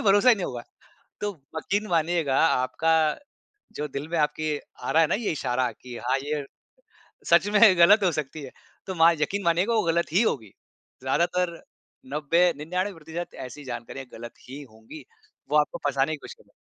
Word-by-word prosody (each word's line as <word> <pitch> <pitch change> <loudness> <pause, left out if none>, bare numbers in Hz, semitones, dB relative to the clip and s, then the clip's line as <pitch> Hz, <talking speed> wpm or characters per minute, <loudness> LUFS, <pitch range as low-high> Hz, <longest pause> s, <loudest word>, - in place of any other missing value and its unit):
भरोसा 205 +5 +5
ही 245 - +8
नहीं 195 -4 -4
होगा। 120 -2 -6 0.6
तो 205 - 0 0.3
यकीन 205 +6 -1
मानिएगा 165 -4 +1
आपका 160 +3 +1 0.8
जो 150 - -3
दिल 140 +1 -6
में 170 - -1
आपके 150 0 0 0.3
आ - - -2
रहा 165 - +5
है 160 - +4
ना - - +2
ये 220 0 -2
इशारा 125 -5 -1
की 125 +3 -11
हाँ 130 - +2
ये 150 0 -2 0.9
सच - - +5
में 205 - +5 0.2
गलत 200 +4 +7
हो 180 - +3
सकती 155 -1 -5
है। 130 - -9 0.4
तो 190 - -4
मा 165 +1 +6
यकीन 200 +6 -1
मानिएगा 180 +7 +2
वो 220 - +2
गलत 170 -1 0
ही 190 - +4
होगी। 110 - -2 0.5
ज़्यादातर 170 +5 0 0.5
90-99% 165 +2 -1
ऐसी 145 +4 -11
जानकारियाँ 125 +2 -7
गलत 120 0 -8 0.2
ही 140 +3 -8
होंगी। 110 +6 -13 0.4
वो 150 - +3
आपको 150 - -1
फसाने 140 +2 +1
की - - -4
कोशिश - - -10
कर - - -23
रह - - -28
155 Hz, 175 wpm, -25 LUFS, 135-175 Hz, 0.9 s, ही